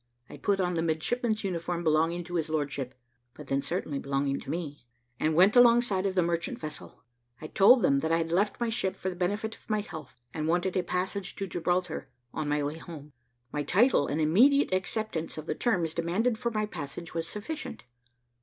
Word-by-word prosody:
I - - -9
put 200 -1 0
on 180 -1 +1
the 165 - 0
midshipman's 215 +8 0
uniform 175 -2 -2
belonging 165 +2 +2
to 175 +1 -10
his 165 -2 -1
lordship 145 -4 -2 0.4
(but - - -10
then 135 0 0
certainly 150 -3 -2
belonging 140 0 -1
to - - -10
me), 145 -6 -5 0.3
and 155 0 +1
went 190 +6 +6
alongside 235 -5 +5
of 190 - -3
the 180 - +4
merchant 170 0 -1
vessel; 155 -1 -9 0.4
I - - -8
told 205 +8 +6
them 140 -4 +4
that 160 +3 -1
I 165 - +4
had 165 0 -2
left 200 +4 +1
my 235 -1 0
ship 225 -5 -1
for 190 - -3
the - - -8
benefit 205 +5 -1
of - - -24
my 215 -1 +1
health, 155 -10 -10
and 155 -1 -2
wanted 175 +2 +1
a 185 - +3
passage 185 +2 -3
to 195 - -3
Gibraltar, 175 -1 -1 0.2
on 155 -2 -2
my 150 0 +1
way 150 +3 -3
home. 150 -4 -10 0.4
My 150 - -1
title, 185 - +3
and 150 - -1
immediate 235 - +4
acceptance 185 -3 -2
of 155 - -6
the - - -1
terms 175 -10 0
demanded 185 +9 0
for 235 - 0
my 215 -2 -1
passage, 165 -3 -7
was 165 0 -2
sufficient. 295 +10 -6
175 Hz, 200 wpm, -29 LUFS, 155-200 Hz, 0.4 s, went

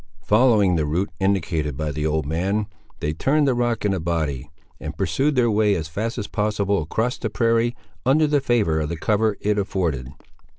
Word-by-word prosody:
Following 105 -5 +4
the 75 -2 0
route 90 +7 -1
indicated 80 -7 0
by 75 0 -2
the 75 +2 -2
old 80 -1 0
man, 95 +8 -1 0.4
they 75 - -1
turned 145 - +2
the 135 - +3
rock 120 -2 0
in 100 - +2
a 95 - -1
body, 80 -5 -2 0.3
and - - -7
pursued 145 +2 +1
their 120 -2 +3
way 105 -1 +3
as 80 -3 -3
fast 110 +8 -3
as 105 - -3
possible 100 -2 0
across 110 +11 -2
the 110 - -2
prairie, 115 +3 +1 0.3
under 145 +5 +4
the 145 -1 +2
favour 110 - +1
of 75 -1 -2
the 85 - -3
cover 105 +3 +1
it 105 0 +1
afforded. 85 -10 -2
100 Hz, 195 wpm, -22 LUFS, 80-115 Hz, 0.4 s, Following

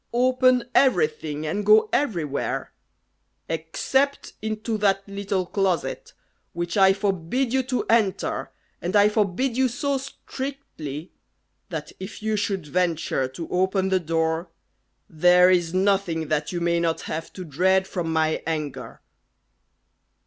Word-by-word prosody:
Open 255 0 +4
everything, 155 - +2
and 195 +7 -2
go 215 +1 +6
everywhere 170 - -1 0.7
except 215 - -1
into 220 +1 -3
that 195 -1 +1
little 200 -2 -2
closet, 190 -1 -1 0.4
which 175 0 -3
I 190 -2 +6
forbid 195 +6 -1
you 265 - +3
to 255 -1 -2
enter, 220 -4 +1 0.3
and 180 +4 -2
I 205 0 +6
forbid 215 +4 0
you 260 +1 +3
so 275 +3 -1
strictly, 260 - -7 0.6
that - - -5
if 190 +3 -8
you 220 0 0
should 200 -4 -2
venture 165 -5 0
to 135 +6 -7
open 190 +1 +1
the 190 -1 +3
door, 165 0 -1 0.6
there 180 +3 +5
is 175 -3 +2
nothing 185 -4 +1
that 150 -1 0
you 175 -1 -3
may 170 0 +2
not 165 -1 0
have 160 +1 -5
to 185 - -7
dread 190 +5 +2
from 170 -4 -3
my 160 -1 +1
anger!" 155 -4 -4
190 Hz, 130 wpm, -24 LUFS, 165-215 Hz, 0.7 s, go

